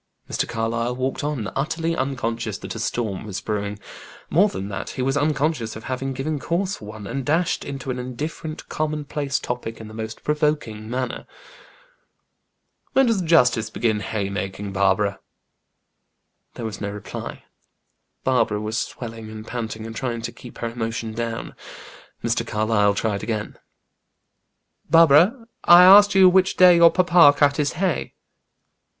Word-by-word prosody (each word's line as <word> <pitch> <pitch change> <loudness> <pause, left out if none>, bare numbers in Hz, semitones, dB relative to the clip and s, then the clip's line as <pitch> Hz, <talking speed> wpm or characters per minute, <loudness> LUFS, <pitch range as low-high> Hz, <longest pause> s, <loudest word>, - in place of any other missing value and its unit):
Mr. - - -2
Carlyle 115 +2 -2
walked 130 +2 -2
on, 145 -8 -2
utterly 165 +4 -1
unconscious 115 - -2
that - - -7
a 115 - -7
storm 110 -4 -2
was 100 -2 -5
brewing. 105 -1 -3 0.5
More 200 +6 +4
than 100 - -5
that, 100 - -5
he 130 - -4
was 135 +1 0
unconscious 145 -4 0
of 110 - -9
having 130 +1 -3
given 140 +3 -3
cause 180 +8 -1
for - - -11
one, 105 0 -9
and 135 +6 -4
dashed 160 +5 0
into 135 -1 -5
an 125 - -4
indifferent, 150 +5 -6
common 155 -1 -3
place 140 -1 -2
topic 120 -2 -5
in 110 - -9
the 110 - -11
most 110 0 -7
provoking 150 -8 -1
manner. 125 0 -4 1.7
"When 270 - +5
does 225 -5 +1
the 170 - -5
justice 125 -9 +4
begin 110 -1 0
haymaking, 100 -1 -4
Barbara?" 100 +1 +1 1.4
There 115 - -6
was 110 -2 -6
no 100 - -2
reply. 105 0 -7 0.8
Barbara 115 -5 +1
was 110 +1 -2
swelling 115 -2 -6
and 110 0 -9
panting, 110 -2 -5
and 115 0 -8
trying 120 -3 -3
to 115 - -4
keep 120 - -13
her 115 - -3
emotion 115 -1 -4
down. 115 0 -4 0.7
Mr. - - +1
Carlyle 105 -1 +1
tried 105 -2 -1
again, 110 -1 -4 1.3
"Barbara, 165 - +5 0.2
I 175 +1 +9
asked 200 +2 +8
you 190 -1 +8
which 185 +1 +3
day 180 -1 +8
your 170 0 +8
papa 175 -5 +5
cut 145 -1 +3
his 145 -2 0
hay." 180 0 -2
125 Hz, 155 wpm, -22 LUFS, 110-155 Hz, 1.7 s, I